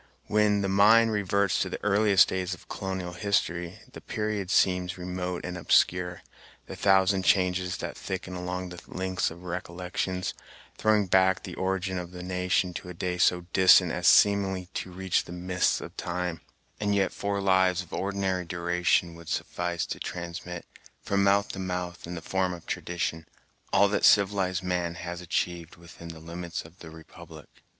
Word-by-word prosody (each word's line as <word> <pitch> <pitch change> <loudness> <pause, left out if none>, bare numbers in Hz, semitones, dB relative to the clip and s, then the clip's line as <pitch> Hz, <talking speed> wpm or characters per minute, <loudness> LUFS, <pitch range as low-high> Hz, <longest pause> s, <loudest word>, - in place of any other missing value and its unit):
When 105 -1 +2
the 100 - 0
mind 110 +4 +5
reverts 100 -2 +1
to - - -1
the - - -6
earliest 100 -1 +5
days 95 0 -2
of - - -19
colonial 95 -2 -4
history, 90 -2 -1
the - - -9
period 105 -3 -3
seems 90 0 +2
remote 90 0 -4
and 90 0 -4
obscure, 90 +1 +2 0.4
the - - -8
thousand 95 0 +3
changes 90 -1 +2
that - - -5
thicken 95 -1 -5
along 90 0 -4
the 90 -1 -9
links 95 0 -1
of 85 +2 -12
recollections, 90 +1 -3 0.4
throwing 110 -1 +2
back 95 +1 +3
the - - -7
origin 95 0 -2
of 90 -1 -6
the 90 0 -7
nation 90 0 0
to 90 - -7
a 90 - -8
day 90 +1 -3
so 90 0 +4
distant 95 -2 +6
as 90 +1 0
seemingly 95 -3 +4
to - - -4
reach 95 0 0
the - - -10
mists 90 +1 0
of - - -9
time; 90 -2 -3 0.4
and 105 -1 +1
yet 95 -1 +1
four 100 0 -2
lives 95 -1 +3
of 85 - -16
ordinary 95 -2 -1
duration 85 0 0
would 85 -1 -11
suffice 85 -1 -2
to - - -5
transmit, 85 0 -6 0.4
from 100 0 +1
mouth 100 +1 +3
to 95 - -6
mouth, 90 -2 -4
in 90 - -5
the 85 - -7
form 95 0 0
of 85 - -10
tradition, 80 -2 -3 0.4
all - - +5
that - - -1
civilized 95 -2 +3
man 90 -2 -1
has 85 +1 -6
achieved 85 -1 -2
within 85 0 -13
the 80 -1 -9
limits 85 +1 -6
of 85 +4 -16
the 80 - -10
republic. 80 0 -13
90 Hz, 170 wpm, -27 LUFS, 90-95 Hz, 0.4 s, distant